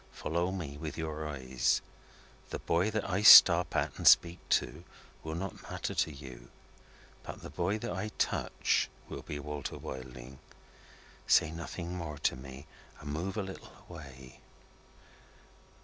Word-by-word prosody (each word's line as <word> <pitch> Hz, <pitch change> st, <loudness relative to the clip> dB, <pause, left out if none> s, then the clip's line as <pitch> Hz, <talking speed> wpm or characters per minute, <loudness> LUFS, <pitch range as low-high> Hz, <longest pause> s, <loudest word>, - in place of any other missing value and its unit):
"Follow 85 Hz, +4 st, -2 dB
me 80 Hz, -7 st, -6 dB
with 80 Hz, 0 st, -6 dB
your 80 Hz, -1 st, -4 dB
eyes. 65 Hz, -3 st, 0 dB, 0.7 s
The -, -, -4 dB
boy 85 Hz, +5 st, 0 dB
that 110 Hz, -1 st, -2 dB
I 95 Hz, +1 st, -1 dB
stop 105 Hz, -, +9 dB
at -, -, 0 dB
and -, -, 0 dB
speak 85 Hz, 0 st, +6 dB
to, 80 Hz, +4 st, 0 dB, 0.4 s
will 80 Hz, 0 st, -5 dB
not 95 Hz, +1 st, -6 dB
matter -, -, -4 dB
to 80 Hz, -, 0 dB
you. 65 Hz, -4 st, -11 dB, 0.7 s
But -, -, -9 dB
the -, -, -8 dB
boy 95 Hz, +4 st, -1 dB
that 105 Hz, -, -5 dB
I 95 Hz, +4 st, -3 dB
touch, -, -, 0 dB, 0.2 s
will -, -, -7 dB
be 75 Hz, -, -6 dB
Walter 75 Hz, -1 st, -6 dB
Wilding. 65 Hz, 0 st, -9 dB, 0.9 s
Say 80 Hz, -, +4 dB
nothing 85 Hz, +1 st, -6 dB
more 80 Hz, -4 st, -6 dB
to -, -, 0 dB
me, 65 Hz, +2 st, -10 dB, 0.3 s
and 70 Hz, 0 st, -6 dB
move 95 Hz, +7 st, -4 dB
a 105 Hz, -, -1 dB
little 95 Hz, 0 st, -10 dB
away." 65 Hz, -6 st, -12 dB
80 Hz, 150 wpm, -31 LUFS, 70-90 Hz, 0.9 s, stop